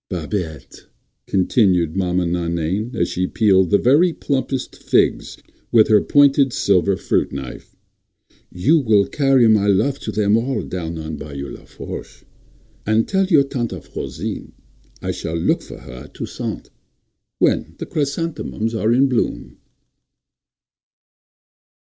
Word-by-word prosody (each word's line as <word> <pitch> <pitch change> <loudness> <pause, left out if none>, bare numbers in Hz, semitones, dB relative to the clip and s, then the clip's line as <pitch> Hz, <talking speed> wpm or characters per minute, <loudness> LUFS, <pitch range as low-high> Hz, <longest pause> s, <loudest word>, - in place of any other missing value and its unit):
"Babette," 85 -3 -5 0.4
continued 90 -4 +2
Maman 90 -2 0
Nainaine, 85 +7 -2
as - - +1
she 90 +1 -2
peeled 95 -4 +3
the 100 - +4
very 150 - +4
plumpest 135 -3 -2
figs - - 0 0.3
with 110 -2 +5
her 105 -1 +5
pointed 140 -2 +4
silver 95 0 +2
fruit - - 0
knife, 65 -2 -8 0.8
"you 145 - +3
will 110 -7 +3
carry 135 -4 +3
my 105 -2 +4
love 135 +8 +2
to 110 - -5
them 105 0 +2
all 115 -3 -1
down 85 -2 -5
on 80 -1 -5
Bayou 70 -1 -7
Lafourche. - - -9 0.6
And 110 +1 +1
tell 190 -1 +1
your 155 -7 +5
Tante 120 -9 -4
Frosine - - -6 0.5
I - - -1
shall 80 +1 -4
look 80 - +1
for - - -11
her 70 - -12
at - - -18
Toussaint—when - - -4
the - - -5
chrysanthemums 140 -6 -3
are 110 0 +1
in 130 +3 +4
bloom." 125 -3 -2
105 Hz, 125 wpm, -20 LUFS, 90-135 Hz, 0.8 s, with